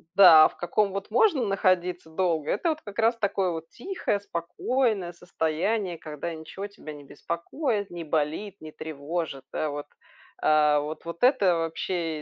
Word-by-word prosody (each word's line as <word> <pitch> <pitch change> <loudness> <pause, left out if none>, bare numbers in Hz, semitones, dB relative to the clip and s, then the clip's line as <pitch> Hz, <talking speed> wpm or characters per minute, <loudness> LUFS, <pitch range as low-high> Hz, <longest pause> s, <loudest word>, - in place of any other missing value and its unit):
да, 165 -5 +9
а - - +4
в - - -19
каком 200 +4 +1
вот 195 +1 -5
можно 270 - +3
находиться 180 -4 +1
долго- 160 -3 0
это 340 - 0
вот 315 0 -2
как 205 -1 -10
раз 230 +1 +4
такое 195 -4 0
вот 165 0 -6
тихое 255 - -2
спокойное 200 +2 -1
состояние, 175 +3 -1
когда 155 +2 -5
ничего 160 +5 -7
тебя 200 -6 -10
не 145 -1 -11
беспокоит, 200 - -3
не 175 -1 -6
болит, 160 +6 -2
не 155 0 -9
тревожит. 155 -2 -5
Да, 155 - -1
вот. 145 0 -5 0.6
А 150 -1 +4
вот 155 +3 -6
вот 170 +5 -6
это 210 -9 +5
вообще, 165 -1 -2
175 Hz, 160 wpm, -26 LUFS, 160-205 Hz, 0.6 s, да